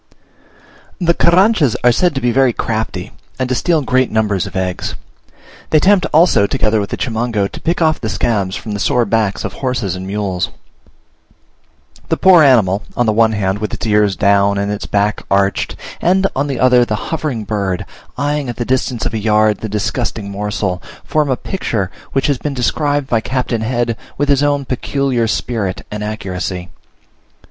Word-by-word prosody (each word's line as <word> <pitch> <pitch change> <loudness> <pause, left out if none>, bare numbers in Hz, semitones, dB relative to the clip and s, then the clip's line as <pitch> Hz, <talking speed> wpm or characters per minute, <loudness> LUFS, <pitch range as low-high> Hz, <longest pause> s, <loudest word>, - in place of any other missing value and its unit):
The 170 -2 +3
Carranchas 170 - +3
are 125 - +6
said 175 +5 +1
to 135 - -1
be 120 - +2
very 130 0 +3
crafty, 110 -5 -3 0.3
and 130 - -1
to - - +1
steal 160 +3 +1
great 130 0 +2
numbers 105 -4 0
of - - -11
eggs. 95 -1 -2 0.7
They 155 - +4
attempt, 190 +4 +4
also, 155 - +4
together 110 +1 +1
with 100 - -3
the - - -3
Chimango, 115 -4 -1
to - - -9
pick 170 +1 0
off 155 -1 +1
the 110 - -2
scabs 100 -4 0
from 110 - -6
the 105 - -3
sore 125 +1 +2
backs 110 -2 0
of - - -4
horses 120 -8 -2
and 95 +1 -6
mules. 95 -3 -2 1.6
The - - +1
poor 185 -3 +6
animal, 110 -9 +4 0.2
on 120 - +2
the 110 - +2
one 110 0 +3
hand, 100 -1 -1
with 105 - -3
its - - -5
ears 105 -2 +2
down 100 -1 +3
and 100 +1 -1
its 105 - -4
back 105 +1 0
arched; 100 0 +1 0.3
and, 190 +2 +3
on 140 +2 0
the 135 -3 -3
other, 125 -1 +5
the 110 -3 -3
hovering 150 -8 -2
bird, 100 -4 -2 0.3
eyeing 145 0 -1
at 120 - -4
the 120 - -3
distance 130 -2 -1
of 120 - -2
a 110 - -1
yard 105 0 +2
the 110 - -5
disgusting 105 0 -2
morsel, 100 -2 -2 0.2
form 150 -2 +1
a 130 - +1
picture, 110 - -3 0.2
which 135 - +1
has 140 -4 +1
been 145 -2 -3
described 145 +3 0
by 120 -4 +1
Captain 125 -2 -2
Head 120 0 -1 0.2
with 145 +1 0
his 140 -1 +4
own 145 -1 +1
peculiar 130 -2 -1
spirit 110 -3 -2
and 105 0 -4
accuracy. 95 -4 -4
115 Hz, 185 wpm, -16 LUFS, 105-135 Hz, 1.6 s, are